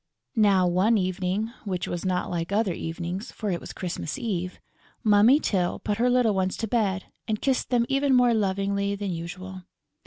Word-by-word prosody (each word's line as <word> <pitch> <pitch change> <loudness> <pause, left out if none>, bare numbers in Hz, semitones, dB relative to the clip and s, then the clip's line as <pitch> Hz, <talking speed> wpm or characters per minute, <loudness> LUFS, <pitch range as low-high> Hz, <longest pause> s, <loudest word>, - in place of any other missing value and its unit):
Now, 200 -4 +4
one 185 +6 +3
evening 185 +3 -1
which 185 -4 -3
was 175 - -4
not 185 -1 -1
like 170 +1 -3
other 205 -2 +1
evenings, 175 +6 -5
for 210 -3 -3
it 175 - -2
was - - -8
Christmas 170 -3 -4
Eve, 180 -5 -3 0.4
Mummy 220 +6 +6
Tyl 180 - 0
put 210 0 -3
her 245 +1 +3
little 245 -3 +3
ones 190 -1 0
to 225 - -2
bed 200 -4 0 0.2
and 215 -1 -1
kissed 265 -3 0
them 240 -2 +2
even 275 0 +2
more 245 -1 +5
lovingly 200 -1 0
than 200 -1 -3
usual. 185 +3 -6
200 Hz, 180 wpm, -26 LUFS, 185-225 Hz, 0.4 s, Mummy